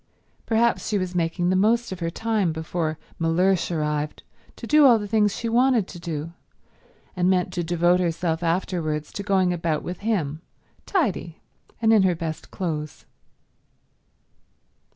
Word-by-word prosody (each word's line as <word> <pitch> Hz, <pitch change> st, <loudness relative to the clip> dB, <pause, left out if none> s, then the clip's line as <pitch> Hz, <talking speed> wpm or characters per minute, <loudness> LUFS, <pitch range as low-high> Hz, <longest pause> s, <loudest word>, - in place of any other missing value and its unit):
Perhaps 230 Hz, +1 st, +2 dB
she 210 Hz, -, +1 dB
was 185 Hz, -2 st, -3 dB
making 175 Hz, +1 st, 0 dB
the -, -, +2 dB
most 225 Hz, +4 st, +2 dB
of 185 Hz, -, -5 dB
her 165 Hz, -1 st, -1 dB
time 215 Hz, -1 st, 0 dB
before 160 Hz, 0 st, -3 dB, 0.2 s
Mellersh 175 Hz, +2 st, +2 dB
arrived 150 Hz, -2 st, -2 dB, 0.3 s
to -, -, -8 dB
do 300 Hz, +5 st, +5 dB
all 250 Hz, -4 st, +7 dB
the 205 Hz, -1 st, -5 dB
things 210 Hz, -1 st, +2 dB
she 235 Hz, -, -3 dB
wanted 240 Hz, -3 st, +3 dB
to 175 Hz, -, -9 dB
do, 165 Hz, -1 st, -5 dB, 0.8 s
and 180 Hz, 0 st, +2 dB
meant 180 Hz, -2 st, +1 dB
to 175 Hz, -, -2 dB
devote 175 Hz, +1 st, +2 dB
herself 170 Hz, -1 st, -1 dB
afterwards 165 Hz, -3 st, -1 dB
to -, -, -4 dB
going 190 Hz, -3 st, +2 dB
about 165 Hz, -3 st, -1 dB
with 180 Hz, -, -6 dB
him, 165 Hz, -9 st, -1 dB, 0.5 s
tidy 210 Hz, -, -1 dB, 0.4 s
and 225 Hz, -1 st, +4 dB
in 215 Hz, -, +6 dB
her 185 Hz, -2 st, +2 dB
best 160 Hz, -2 st, -5 dB
clothes. 155 Hz, -5 st, -4 dB
180 Hz, 155 wpm, -24 LUFS, 165-205 Hz, 0.8 s, all